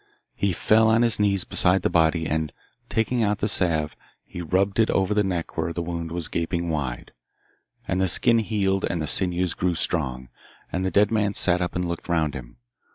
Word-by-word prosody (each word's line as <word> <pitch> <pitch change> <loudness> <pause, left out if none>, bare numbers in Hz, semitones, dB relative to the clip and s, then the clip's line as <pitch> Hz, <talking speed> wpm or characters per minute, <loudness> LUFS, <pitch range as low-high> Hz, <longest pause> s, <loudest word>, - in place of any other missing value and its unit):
He 100 - -1
fell 110 +5 +3
on 115 +2 +3
his 115 -3 +2
knees 100 -2 +2
beside 90 0 +3
the - - +1
body, 80 -1 +2
and, 80 -1 -2 0.4
taking 115 +2 0
out 105 -1 +1
the 105 - -1
salve, 80 -6 0 0.3
he 90 - -9
rubbed 95 +5 0
it 110 - +3
over 95 +1 +1
the 105 0 +2
neck 90 -4 -4
where 80 +1 -2
the 85 +1 -4
wound 85 -1 -5
was 85 -2 -3
gaping 85 +1 -3
wide, 70 -6 -4 0.8
and 95 - -1
the 95 - +2
skin 115 +6 +5
healed 100 -3 -1
and 85 - -2
the 80 - -2
sinews 90 +1 0
grew 90 -1 -1
strong, 65 -7 -3 0.4
and 90 - -2
the 95 - 0
dead 105 +2 +2
man 105 -2 0
sat 90 -1 +4
up 90 - -3
and 90 0 -1
looked 85 +1 -6
round 80 -3 0
him. 60 -3 -10
90 Hz, 205 wpm, -24 LUFS, 80-100 Hz, 0.8 s, skin